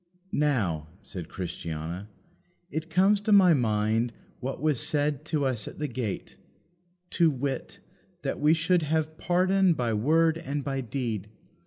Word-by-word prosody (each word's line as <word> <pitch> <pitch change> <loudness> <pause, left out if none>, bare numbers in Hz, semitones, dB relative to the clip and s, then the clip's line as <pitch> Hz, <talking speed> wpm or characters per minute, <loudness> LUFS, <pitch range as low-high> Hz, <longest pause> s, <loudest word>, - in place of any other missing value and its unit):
"Now," 105 - 0 0.2
said 90 -3 -7
Christiana, 85 +1 -5 0.6
"it 160 +1 -3
comes 195 +4 +4
to 210 - -1
my 190 -4 +7
mind 110 -2 +1 0.3
what 130 +2 -4
was 150 -3 +1
said 145 -1 0
to 155 -3 0
us 120 -6 -1
at - - -8
the 150 - -2
gate; 120 -5 -4 0.7
to 170 -2 +4
wit, 135 -1 -3 0.4
that - - -2
we 150 +2 +5
should 170 +2 +2
have 155 +1 -1
pardon 185 0 +3
by 120 -4 0
word 160 +8 +3
and 145 -3 -3
by 135 -1 -2
deed. 115 -4 -3
145 Hz, 145 wpm, -28 LUFS, 115-160 Hz, 0.7 s, my